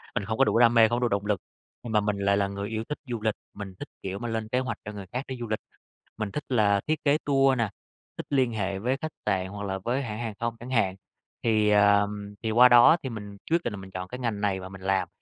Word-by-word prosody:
Mình -, -, -1 dB
không 110 Hz, +2 st, -2 dB
có 135 Hz, -, +5 dB
đủ 115 Hz, -, +2 dB
đam 120 Hz, -1 st, +6 dB
mê, 115 Hz, -1 st, +7 dB
không 120 Hz, -, +1 dB
có -, -, 0 dB
đủ 120 Hz, -, +3 dB
động 100 Hz, -1 st, -1 dB
lực, 100 Hz, -4 st, 0 dB, 0.4 s
nhưng 120 Hz, -2 st, -5 dB
mà 105 Hz, -, +5 dB
mình 105 Hz, -1 st, -1 dB
lại 100 Hz, 0 st, +2 dB
là 100 Hz, -1 st, +1 dB
người 100 Hz, +1 st, -5 dB
yêu 110 Hz, 0 st, -2 dB
thích 150 Hz, -, -3 dB
du 120 Hz, -3 st, -3 dB
lịch, 110 Hz, -1 st, 0 dB, 0.2 s
mình 100 Hz, -2 st, -8 dB
thích, -, -, -6 dB, 0.2 s
kiểu 95 Hz, +1 st, -4 dB
mà, 120 Hz, -, -4 dB
lên 115 Hz, -1 st, -2 dB
kế 125 Hz, -, +1 dB
hoạch 130 Hz, -4 st, -3 dB
cho 105 Hz, -, -5 dB
người 100 Hz, -2 st, -8 dB
khác 125 Hz, +2 st, -2 dB
đi 130 Hz, -, -5 dB
du 120 Hz, -, -4 dB
lịch, 110 Hz, 0 st, -1 dB, 0.6 s
mình 110 Hz, -2 st, -3 dB
thích 150 Hz, -, -4 dB
là 105 Hz, -5 st, +3 dB
thiết 155 Hz, 0 st, 0 dB
kế 145 Hz, 0 st, +4 dB
tour 135 Hz, -2 st, +3 dB
nè, 115 Hz, -3 st, +1 dB, 0.5 s
thích -, -, -5 dB
liên 130 Hz, -4 st, +2 dB
hệ 100 Hz, -2 st, -2 dB
với 125 Hz, +6 st, 0 dB
khách 155 Hz, +2 st, -5 dB
sạn 95 Hz, 0 st, 0 dB
hoặc 100 Hz, +1 st, -7 dB
là 95 Hz, -1 st, -2 dB
với 120 Hz, +7 st, -1 dB
hãng 110 Hz, -3 st, -5 dB
hàng 115 Hz, -2 st, -3 dB
không 115 Hz, 0 st, -2 dB
chẳng 120 Hz, -, -9 dB
hạn. 105 Hz, -7 st, +2 dB, 0.5 s
Thì, 110 Hz, -2 st, +3 dB
ờ, 100 Hz, 0 st, +5 dB, 0.4 s
thì 110 Hz, -, 0 dB
qua 125 Hz, +3 st, +7 dB
đó 120 Hz, +7 st, +8 dB
thì 130 Hz, -, -3 dB
mình 105 Hz, -3 st, -8 dB
quyết 170 Hz, +1 st, +3 dB
định 120 Hz, -, -2 dB
là -, -, -5 dB
mình 95 Hz, 0 st, -10 dB
chọn 90 Hz, 0 st, -5 dB
cái 125 Hz, +6 st, -7 dB
ngành 115 Hz, -5 st, -2 dB
này 100 Hz, -2 st, +1 dB
và 95 Hz, 0 st, -8 dB
mình 95 Hz, 0 st, -11 dB
làm, 95 Hz, -1 st, +1 dB
110 Hz, 290 wpm, -27 LUFS, 100-120 Hz, 0.6 s, đó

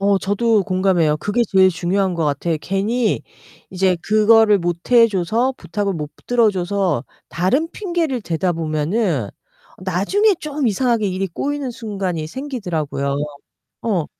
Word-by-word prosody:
어 200 Hz, 0 st, +3 dB
저도 205 Hz, +2 st, +1 dB
공감해요. 185 Hz, -5 st, +2 dB
그게 205 Hz, +9 st, 0 dB
제일 190 Hz, -1 st, +5 dB
중요한 185 Hz, +2 st, 0 dB
것 165 Hz, -, -1 dB
같아요. 150 Hz, +3 st, 0 dB
괜히 215 Hz, +6 st, 0 dB, 0.5 s
이제 185 Hz, -1 st, +1 dB
그거를 215 Hz, +1 st, +5 dB
못 175 Hz, -1 st, -1 dB, 0.2 s
해 230 Hz, -1 st, +7 dB
줘서, 220 Hz, +6 st, 0 dB
부탁을 205 Hz, -2 st, -3 dB
못 150 Hz, -4 st, -5 dB, 0.2 s
들어줘서 195 Hz, -, +1 dB, 0.2 s
다른 255 Hz, -, 0 dB
핑계를 340 Hz, -, -2 dB
대다 175 Hz, 0 st, -1 dB
보면은 155 Hz, -, -1 dB, 0.6 s
나중에 205 Hz, -, +2 dB
좀 295 Hz, -2 st, -2 dB
이상하게 230 Hz, -1 st, +1 dB
일이 190 Hz, +1 st, -2 dB
꼬이는 285 Hz, -, -3 dB
순간이 195 Hz, -8 st, -4 dB
생기더라고요. 165 Hz, -, -3 dB, 0.7 s
어. 195 Hz, -9 st, 0 dB
195 Hz, 295 characters per minute, -20 LUFS, 175-230 Hz, 0.7 s, 해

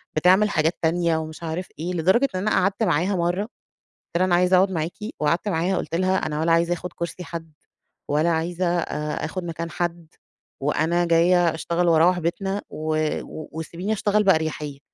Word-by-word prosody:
بتعمل 185 Hz, +6 st, +4 dB
حاجات 160 Hz, -1 st, +1 dB
تانية 165 Hz, 0 st, +2 dB
ومش 160 Hz, +1 st, -6 dB
عارف 165 Hz, +3 st, -3 dB
إيه. 175 Hz, +3 st, -3 dB
لدرجة 190 Hz, -, +3 dB
إن -, -, 0 dB
أنا 215 Hz, +2 st, 0 dB
قعدت 195 Hz, +4 st, +1 dB
معاها 190 Hz, 0 st, +1 dB
مَرّة، 175 Hz, +2 st, 0 dB, 0.5 s
قُلت -, -, -7 dB
لها: 185 Hz, -, +3 dB
"أنا 180 Hz, -2 st, +3 dB
عايزة 180 Hz, +1 st, +4 dB
أقعد 190 Hz, +1 st, +3 dB
معاكِ." 165 Hz, -1 st, -2 dB, 0.3 s
وقعدت 170 Hz, +6 st, +1 dB
معاها 180 Hz, +1 st, 0 dB
قُلت 165 Hz, -, -3 dB
لها: 185 Hz, +2 st, +2 dB
"أنا 150 Hz, -3 st, -2 dB
ولا 165 Hz, +1 st, +2 dB
عايزة 170 Hz, +1 st, +3 dB
آخد 175 Hz, 0 st, -6 dB
كرسي 170 Hz, +1 st, -5 dB
حد، 165 Hz, -1 st, -7 dB, 0.6 s
ولا 155 Hz, +3 st, +2 dB
عايزة 170 Hz, +3 st, -1 dB
آآ، 150 Hz, -2 st, -3 dB
آخد 185 Hz, +3 st, -4 dB
مكان 170 Hz, 0 st, -5 dB
حد، 170 Hz, -1 st, -3 dB, 0.5 s
وأنا 160 Hz, +5 st, +1 dB
جاية 170 Hz, 0 st, +4 dB
أشتغل 170 Hz, +2 st, -1 dB
وأروّح 170 Hz, +2 st, +4 dB
بيتنا، 195 Hz, +4 st, -2 dB
و 155 Hz, +1 st, -6 dB, 0.4 s
و 155 Hz, -, -9 dB
وسيبيني 170 Hz, +6 st, -4 dB
أشتغل 210 Hz, 0 st, +1 dB
بأريحيّة، 155 Hz, -6 st, 0 dB
170 Hz, 175 wpm, -23 LUFS, 160-185 Hz, 0.6 s, بتعمل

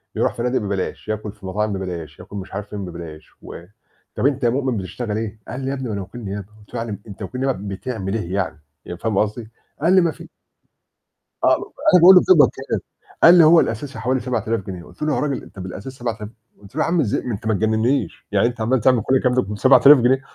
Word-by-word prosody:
يروح -, -, +1 dB
فنادق 125 Hz, +2 st, -1 dB
ببلاش، 100 Hz, -1 st, -4 dB
ياكل 105 Hz, -1 st, -3 dB
في 95 Hz, -2 st, -15 dB
مطاعم 105 Hz, +2 st, -1 dB
ببلاش، 85 Hz, -6 st, -6 dB
ياكل -, -, -11 dB
مش 95 Hz, 0 st, -8 dB
عارف 100 Hz, +1 st, -5 dB
فين 100 Hz, -2 st, -5 dB
ببلاش. 85 Hz, -3 st, -9 dB
و 85 Hz, -, -10 dB, 0.5 s
"طَب -, -, -1 dB
أنت 140 Hz, -2 st, -1 dB
يا 120 Hz, -, +4 dB
مؤمن 130 Hz, -1 st, -1 dB
بتشتغل 105 Hz, +3 st, -4 dB
إيه؟"، 110 Hz, -1 st, -5 dB
قال 130 Hz, -, -6 dB
لي: 130 Hz, -, -3 dB
"يا -, -, -1 dB
ابني 130 Hz, -2 st, -5 dB
ما 110 Hz, -, -4 dB
أنا 100 Hz, -, -3 dB
وكيل 95 Hz, +6 st, -9 dB
نيابة"، 100 Hz, 0 st, -5 dB
قُلت 105 Hz, -, -21 dB
له: 120 Hz, -, -3 dB
"يعني 110 Hz, -3 st, -6 dB
أنت 100 Hz, -, -11 dB
وكيل 125 Hz, +7 st, -5 dB
نيابة 100 Hz, -7 st, -2 dB
بتعمل 95 Hz, -4 st, -4 dB
إيه 95 Hz, -5 st, -4 dB
يعني؟"، 95 Hz, -5 st, -2 dB, 0.3 s
ي 90 Hz, -, -7 dB
فاهم 110 Hz, +1 st, -2 dB
قصدي؟ 110 Hz, +2 st, -1 dB, 0.3 s
قال 170 Hz, +4 st, +3 dB
لي: 185 Hz, -, +6 dB
"ما 170 Hz, -2 st, +1 dB
في" -, -, -13 dB, 1.1 s
آه، -, -, +5 dB, 0.4 s
أنا 180 Hz, -, +8 dB
باقول 185 Hz, +3 st, +9 dB
له: 180 Hz, -, +8 dB
"بتقبض 370 Hz, -, +6 dB
كام؟"، -, -, -4 dB, 0.4 s
قال 170 Hz, -, +10 dB
لي: 170 Hz, -, +8 dB
"هو 165 Hz, +2 st, +7 dB
الأساسي 115 Hz, +2 st, -2 dB
حوالي 130 Hz, +3 st, 0 dB
7,000 115 Hz, -3 st, -2 dB
جنيه"، 90 Hz, -3 st, -6 dB
قُلت -, -, -17 dB
له: 150 Hz, -1 st, +1 dB
"يا -, -, 0 dB
راجل 140 Hz, 0 st, -2 dB
أنت 95 Hz, -, -13 dB
بالأساس 95 Hz, +7 st, -7 dB
7000"، 115 Hz, -4 st, -5 dB, 0.3 s
قُلت 100 Hz, +4 st, -16 dB
له: 155 Hz, -, 0 dB
"يا -, -, +1 dB
عم 170 Hz, +1 st, +1 dB
إزاي 110 Hz, -8 st, 0 dB
ما 125 Hz, -, -4 dB
أنت 105 Hz, -, -7 dB
ما 110 Hz, -, +2 dB
تجننيش! 110 Hz, +6 st, 0 dB
يعني 100 Hz, +3 st, +3 dB
أنت 120 Hz, -1 st, -5 dB
عمّال 120 Hz, +2 st, +1 dB
تعمل 125 Hz, -1 st, +4 dB
كل 130 Hz, +5 st, +1 dB
الكلام 125 Hz, -1 st, +2 dB
ده 130 Hz, -, +4 dB
ب7000 130 Hz, +8 st, +6 dB
جنيه؟ 130 Hz, +2 st, +3 dB
110 Hz, 240 wpm, -21 LUFS, 100-130 Hz, 1.1 s, قال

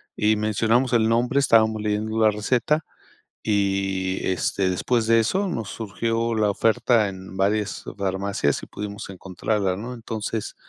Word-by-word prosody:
y 110 Hz, +1 st, +2 dB
mencionamos 115 Hz, +4 st, +1 dB
el 110 Hz, -2 st, +3 dB
nombre, 120 Hz, +4 st, +2 dB
estábamos 110 Hz, -5 st, +3 dB
leyendo 105 Hz, +1 st, -1 dB
la 110 Hz, -1 st, +5 dB
receta 125 Hz, +8 st, 0 dB, 0.6 s
y, 95 Hz, -2 st, 0 dB
este, 95 Hz, +1 st, 0 dB
después 115 Hz, +5 st, 0 dB
de 115 Hz, 0 st, +5 dB
eso 190 Hz, -, 0 dB
nos 115 Hz, -, -3 dB
surgió 115 Hz, +2 st, -2 dB
la 105 Hz, -2 st, +2 dB
oferta 115 Hz, +1 st, +2 dB
en 95 Hz, 0 st, -9 dB
varias 105 Hz, +2 st, 0 dB
farmacias 95 Hz, -5 st, -1 dB
y -, -, -8 dB
pudimos 100 Hz, -1 st, -7 dB
encontrarla, 95 Hz, +1 st, -2 dB
¿no? 115 Hz, +6 st, -6 dB
Entonces, 115 Hz, -2 st, -4 dB
110 Hz, 140 wpm, -24 LUFS, 100-115 Hz, 0.6 s, la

